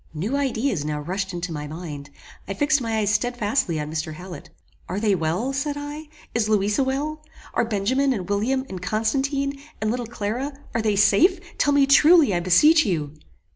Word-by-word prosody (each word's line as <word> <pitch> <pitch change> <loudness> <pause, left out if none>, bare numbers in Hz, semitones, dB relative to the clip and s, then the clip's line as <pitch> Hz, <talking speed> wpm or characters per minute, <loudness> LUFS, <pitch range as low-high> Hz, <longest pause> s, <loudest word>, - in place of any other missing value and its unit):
New 200 - -2
ideas 260 - 0
now 150 0 -3
rushed 190 +5 -3
into 175 -1 -4
my 150 -2 -5
mind. 150 -3 -7 0.4
I 195 - -4
fixed 290 +3 +2
my 225 -2 -1
eyes 210 -1 +1
stedfastly 210 - 0
on 150 0 -4
Mr. 155 0 -3
Hallet. 180 +2 -10 0.4
"Are 185 +3 -2
they 210 -1 +2
well?" 180 +10 -1
said 285 +2 -2
I. 295 +2 -7 0.3
"Is 225 -2 0
Louisa 210 +4 +2
well? 295 +4 -3 0.3
Are - - +2
Benjamin, 235 +6 +1
and 195 -8 -3
William, 235 +7 0
and 185 -5 -7
Constantine, 275 +7 -1 0.2
and 215 0 0
Little 245 -1 -3
Clara, 235 +5 -3 0.2
are 230 - 0
they 215 -2 +1
safe? 215 - +4 0.2
Tell 290 - +3
me 285 -1 +5
truly, 295 - +6
I 175 - +1
beseech 300 - +5
you!" 155 - -2
220 Hz, 180 wpm, -23 LUFS, 180-275 Hz, 0.4 s, truly